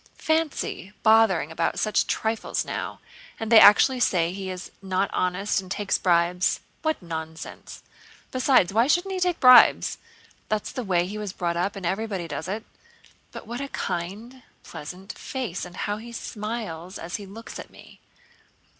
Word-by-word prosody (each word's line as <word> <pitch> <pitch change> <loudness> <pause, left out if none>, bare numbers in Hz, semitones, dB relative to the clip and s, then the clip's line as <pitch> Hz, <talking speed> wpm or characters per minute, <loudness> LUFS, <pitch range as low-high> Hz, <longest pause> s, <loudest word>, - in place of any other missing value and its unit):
Fancy 315 - -1
bothering 220 -8 +4
about 160 - -1
such 215 - +1
trifles 220 0 -1
now! - - -5 0.4
And 225 0 -4
they 225 - +10
actually 230 +5 +7
say 175 -7 +2
he 190 0 -5
is 185 0 -7
not 190 0 -1
honest 185 +3 0
and 185 - -13
takes 200 +1 -1
bribes. 175 +1 +2 0.2
What 315 0 0
nonsense! 160 -1 -7 0.5
Besides, 255 -8 +3
why 230 +4 +4
shouldn't 350 +6 +1
he 375 - -2
take 360 -1 0
bribes? 255 -1 +7 0.5
That's 215 -1 -1
the 255 -1 -4
way 180 -4 +1
he 205 +3 -6
was 205 -3 -5
brought 170 -3 -2
up, 180 +4 -1
and 195 -2 -6
everybody 195 -1 -2
does 160 +1 -5
it. 210 +4 -4 0.7
But - - -9
what 240 +4 -5
a 280 - -3
kind, 215 +5 -5 0.2
pleasant 180 +6 -9
face 245 -11 -4
and 180 0 -11
how 205 0 -2
he 235 +2 -10
smiles 210 -6 -5
as 170 +5 -5
he 205 -2 -10
looks 225 +4 -9
at - - -9
me." - - -16
200 Hz, 165 wpm, -25 LUFS, 180-230 Hz, 0.7 s, they